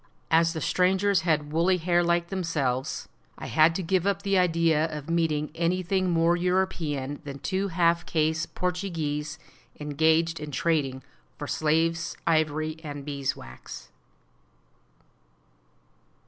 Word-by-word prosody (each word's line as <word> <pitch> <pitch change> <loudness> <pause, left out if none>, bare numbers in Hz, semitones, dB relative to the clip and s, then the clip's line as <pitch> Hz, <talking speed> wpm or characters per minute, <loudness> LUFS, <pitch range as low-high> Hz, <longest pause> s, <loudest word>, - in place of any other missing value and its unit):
As 165 +1 +4
the 160 - -4
strangers 190 +3 +2
had 155 -3 0
woolly 175 +3 +3
hair 175 0 +2
like 170 0 +1
themselves, 150 -9 -2 0.3
I - - -7
had 160 +1 +4
to 190 - -2
give 185 +2 +1
up 200 0 0
the 200 -1 +1
idea 165 -3 +3
of 155 0 -5
meeting 155 -3 0
anything 185 +2 0
more 170 0 +3
European 170 -6 -1
than 140 -2 -7
two 190 +6 -1
half 170 -1 +1
caste 160 -1 0
Portuguese 165 -5 -2 0.4
engaged 160 +3 +2
in 150 0 -6
trading 140 -2 0 0.3
for - - -5
slaves, 165 +2 0
ivory, 155 -1 +1
and 145 -2 -6
beeswax. 135 - -5
165 Hz, 120 wpm, -27 LUFS, 150-175 Hz, 0.4 s, As